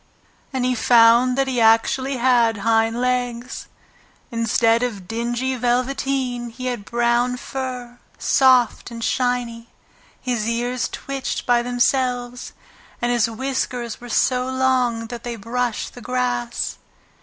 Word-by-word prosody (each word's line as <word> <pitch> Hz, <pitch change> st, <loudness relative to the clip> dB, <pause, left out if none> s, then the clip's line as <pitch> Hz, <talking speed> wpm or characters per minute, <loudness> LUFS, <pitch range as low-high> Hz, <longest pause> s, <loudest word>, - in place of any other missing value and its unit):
And 260 Hz, -2 st, -1 dB
he 255 Hz, -, +2 dB
found 240 Hz, +1 st, +5 dB
that 270 Hz, 0 st, +2 dB
he 250 Hz, -3 st, 0 dB
actually 240 Hz, +4 st, +3 dB
had 235 Hz, -3 st, +3 dB
hind 225 Hz, +1 st, +2 dB
legs! 250 Hz, 0 st, -2 dB, 0.6 s
Instead 230 Hz, 0 st, +2 dB
of 210 Hz, -7 st, -3 dB
dingy 240 Hz, +3 st, -2 dB
velveteen 250 Hz, 0 st, -1 dB
he 255 Hz, +3 st, -8 dB
had 245 Hz, -5 st, -3 dB
brown 240 Hz, +2 st, +1 dB
fur, 250 Hz, -2 st, -6 dB, 0.2 s
soft 255 Hz, -4 st, +3 dB
and 230 Hz, -1 st, -7 dB
shiny, 240 Hz, -2 st, -1 dB, 0.5 s
his 235 Hz, -4 st, -2 dB
ears 240 Hz, +1 st, -1 dB
twitched 275 Hz, -1 st, -4 dB
by 240 Hz, -1 st, +3 dB
themselves, 245 Hz, 0 st, -1 dB, 0.5 s
and 240 Hz, 0 st, 0 dB
his 240 Hz, -1 st, +2 dB
whiskers 245 Hz, -1 st, -3 dB
were 245 Hz, -, -9 dB
so 250 Hz, +2 st, +1 dB
long 255 Hz, -3 st, +1 dB
that 235 Hz, 0 st, -8 dB
they 240 Hz, -1 st, -4 dB
brushed 235 Hz, +2 st, -3 dB
the 245 Hz, -, -11 dB
grass. 125 Hz, -, -2 dB
245 Hz, 125 wpm, -21 LUFS, 230-255 Hz, 0.6 s, found